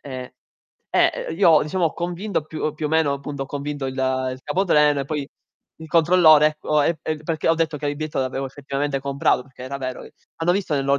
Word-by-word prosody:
e 130 -2 -8 0.6
eh, - - +1
io 165 -4 +5
diciamo 170 +4 -1
ho 160 - -3
convinto 175 +1 -3
più 155 0 -3
più 155 0 -3
o - - -2
meno 160 -2 +2
appunto, 140 0 -5
ho - - -12
convinto 145 0 -4
il 130 - -4
il 130 -1 -1
capotreno 150 -4 +3
e - - -3
poi 150 -2 -3 0.5
il 160 - -9
controllore 160 -2 +6
ecco, 150 0 +1 0.4
perché 160 -1 -1
ho 165 - +5
detto 160 -2 -1
che 145 - -4
il 145 0 -2
biglietto 155 0 -4
l'avevo 135 +1 -2
effettivamente 140 +1 -3
comprato 140 -2 +1
perché 130 -1 -14
era 135 +2 -5
vero 130 -1 -5
e - - -13 0.2
hanno 165 +2 +1
visto 185 -4 -1
nei 140 - +1
lo 140 0 +2
150 Hz, 210 wpm, -22 LUFS, 135-160 Hz, 0.6 s, controllore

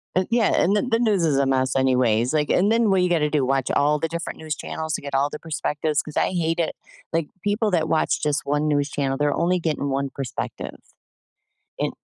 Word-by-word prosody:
Uh, 185 - +3
yeah, 230 -3 +3
and 195 +4 +3
the 205 - +3
the 230 -3 0
news 210 -6 +2
is 150 -4 +2
a 140 - +3
mess 130 -1 +1
anyways. 125 -2 +2
Like, 150 -1 +1
and 200 +4 +3
then 230 -1 +3
what 190 -1 +3
you 180 - +2
gonna 160 -4 +2
do? 145 -3 +1
Watch 135 0 0
all 150 +1 +2
the 165 - -1
different 170 +1 -5
news 155 -1 -4
channels 160 0 -5
to - - -2
get 140 0 -7
all 140 +2 +2
the 150 - -6
perspectives 155 -1 -1
'cause 150 - -9
I - - +2
hate 165 -2 -1
it. 165 - -1 0.4
Like, 165 -2 0 0.2
people 210 +2 +1
that 160 -3 +1
watch 160 - +1
just 150 -1 0
1 145 +2 0
news 145 -1 +1
channel, 135 -2 -1
they're 145 0 +1
only 180 +2 +1
getting 155 -4 -2
1 135 0 -1
perspective. 135 -3 -5 1.0
And - - -1
155 Hz, 230 wpm, -23 LUFS, 140-175 Hz, 1.0 s, Uh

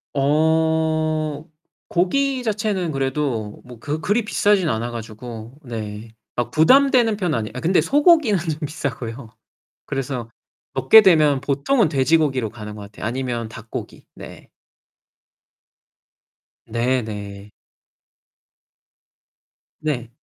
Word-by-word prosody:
어. 155 +1 +1 0.4
고기 260 +9 0
자체는 205 -6 -1
그래도 135 -6 -2
뭐 125 -2 -12
그 145 +5 -3
그리 205 +8 +1
비싸진 205 -4 +2
않아 115 0 -2
가지고. 115 +2 -8
네. 110 -2 -7 0.2
아 120 -1 -1
부담되는 245 - +4
편은 180 - 0
아니에요. 110 -1 -4
아 - - -3
근데 175 +3 +3
소고기는 290 - +4
좀 155 -2 -3
비싸고요. 125 -5 -5 0.6
그래서 130 -3 -4 0.4
먹게 135 - +7
되면 155 -8 +4
보통은 150 - +1
돼지고기로 135 -4 +2
가는 105 -2 -8
것 105 - -9
같아요. 100 0 -9
아니면 120 -2 -3
닭고기. 115 0 -8
네. - - -12 2.2
네네. 110 -4 -3 2.3
네. 130 -7 -3
140 Hz, 225 characters per minute, -21 LUFS, 115-170 Hz, 2.3 s, 먹게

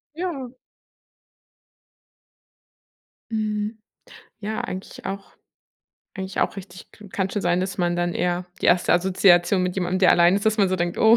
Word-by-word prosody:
Ja. 325 -8 -4 2.8
Mhm, 215 0 -2 0.6
ja 215 +1 -3
eigentlich 185 +1 -7
auch 195 0 -6 0.8
eigentlich 190 -1 -4
auch - - 0
richtig 185 -2 -11
k 210 -2 -14
kann 190 0 -2
schon 205 - -2
sein, 175 +1 +2
dass 185 0 -4
man 175 0 +1
dann 175 0 0
eher 180 0 -1 0.2
die - - 0
erste 175 - +4
Assoziation 180 0 +4
mit 180 0 -1
jemandem, 185 0 -1
der 185 - +6
allein 175 +2 +5
ist, 200 - -3
dass 220 0 +2
man 195 -2 +4
so 185 - 0
denkt: 175 0 -2
„Oh, 220 +1 +6
190 Hz, 155 wpm, -23 LUFS, 175-210 Hz, 2.8 s, der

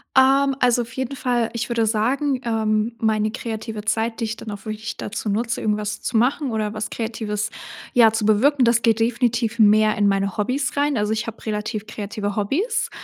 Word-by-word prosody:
Ähm, 270 +1 +5
also, 245 -1 +3
auf 230 - -12
jeden 265 +1 -3
Fall, 245 -3 0
ich 235 +1 -3
würde 235 -1 +1
sagen 255 +5 +1
ähm, 220 0 0
meine 215 -1 +1
kreative 220 -2 -5
Zeit, 225 +1 -1
die 230 - 0
ich 220 +1 -4
dann 215 - -7
auch 205 +1 -8
wirklich 220 +1 -5
dazu 215 +1 -5
nutze, 230 +3 -1
irgendwas 210 -1 -1
zu 235 - 0
machen 260 +3 +1
oder 215 -1 -2
was 215 0 -4
Kreatives, 220 -2 -3 0.4
ja, 230 -3 +6
zu 225 -1 -1
bewirken, 260 +6 +4
das 235 0 +3
geht 225 -1 +3
definitiv 235 0 0
mehr 215 0 +5
in 205 -1 +3
meine 195 -1 0
Hobbys 255 +8 -1
rein. 285 -2 +1
Also, 210 0 0
ich 220 +1 -2
habe 230 - -8
relativ 215 0 -3
kreative 205 -1 -4
Hobbys, 380 - 0
225 Hz, 195 wpm, -22 LUFS, 215-245 Hz, 0.4 s, ja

